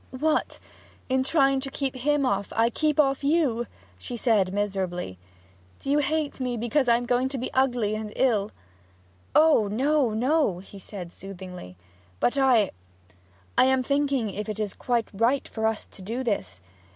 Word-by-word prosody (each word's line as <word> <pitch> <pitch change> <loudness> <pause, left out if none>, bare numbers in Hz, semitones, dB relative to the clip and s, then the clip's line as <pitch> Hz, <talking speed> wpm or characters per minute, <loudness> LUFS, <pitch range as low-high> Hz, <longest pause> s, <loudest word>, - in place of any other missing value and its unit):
'What 305 +4 0 0.5
in 260 0 +2
trying 275 -1 +3
to 270 +1 -5
keep 270 -1 -2
off 255 - -7
him, 295 0 +2
I 225 +1 +1
keep 305 +3 0
off 275 -1 +3
you?' 280 -6 +1 0.3
she 240 - -6
said 215 -6 +2
miserably. 190 - -2 0.6
'Do 275 - -3
you 295 - +4
hate 295 0 -1
me 250 -2 -2
because 240 +3 +1
I 235 - +6
am 245 - -4
going 250 +2 +1
to 270 - -4
be 255 - -4
ugly 245 -5 +1
and 215 0 -4
ill?' 215 -6 +2 0.9
'Oh 305 -9 +5
no, 265 +5 +2
no!' 255 - +2
he 195 +2 -12
said 185 -3 -8
soothingly. 180 - -9 0.4
'But 245 - +2
I 255 -7 +4 0.8
I - - +6
am 260 0 +3
thinking 275 -5 0
if 210 +2 -5
it 215 0 -4
is 210 -3 -2
quite 240 -2 -1
right 235 +7 +1
for 220 -1 -1
us 220 -1 -2
to - - -16
do 230 +7 -3
this. 95 - -3
245 Hz, 170 wpm, -26 LUFS, 205-275 Hz, 0.9 s, I